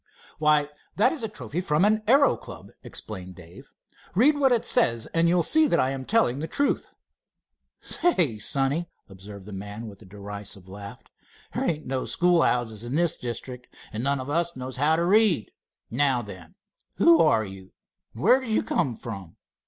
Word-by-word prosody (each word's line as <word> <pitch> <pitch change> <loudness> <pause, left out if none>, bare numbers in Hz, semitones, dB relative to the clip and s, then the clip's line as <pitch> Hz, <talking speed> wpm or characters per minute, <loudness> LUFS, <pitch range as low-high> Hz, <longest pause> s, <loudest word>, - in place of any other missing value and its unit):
"Why, 150 -1 +3 0.3
that 205 - +3
is 320 - -5
a 225 - -2
trophy 195 -5 -5
from 165 0 +2
an 215 +1 +2
aero 275 +4 +5
club," - - -12
explained 95 -4 -5
Dave. 85 -1 -14 0.5
"Read 275 +10 +5
what 275 -2 +3
it 235 -2 +2
says, 115 -1 +2
and 170 0 +3
you'll 175 0 +3
see 315 - +5
that - - +2
I 130 - +2
am 135 -1 -5
telling 140 - +2
the 160 - -4
truth." 285 +9 -1 0.9
"Say, 170 - 0
sonny," 140 +8 0 0.2
observed 100 0 -11
the 105 - -9
man, 100 +3 -7
with 105 -2 -11
a - - -14
derisive 100 -1 -9
laugh, 100 +1 -10 0.5
"there - - -1
ain't 150 -5 -2
any 130 - -1
schoolhouses 125 - +1
in 120 +3 -4
this 170 0 +2
district, 125 +1 -6 0.3
and 110 +2 -3
none 140 0 0
of 130 - -6
us 170 +3 -1
know 130 0 -6
how 145 +5 +2
to 170 +1 0
read. 200 - +3 0.4
Now 130 0 +1
then, 95 -6 -11 0.4
who 170 0 +5
are 145 -9 +3
you, 95 -1 -11 0.4
and 115 - -7
where 255 - +6
did 260 -3 -7
you 220 - +1
come 135 - -1
from?" 100 -8 -8
135 Hz, 180 wpm, -25 LUFS, 105-175 Hz, 0.9 s, where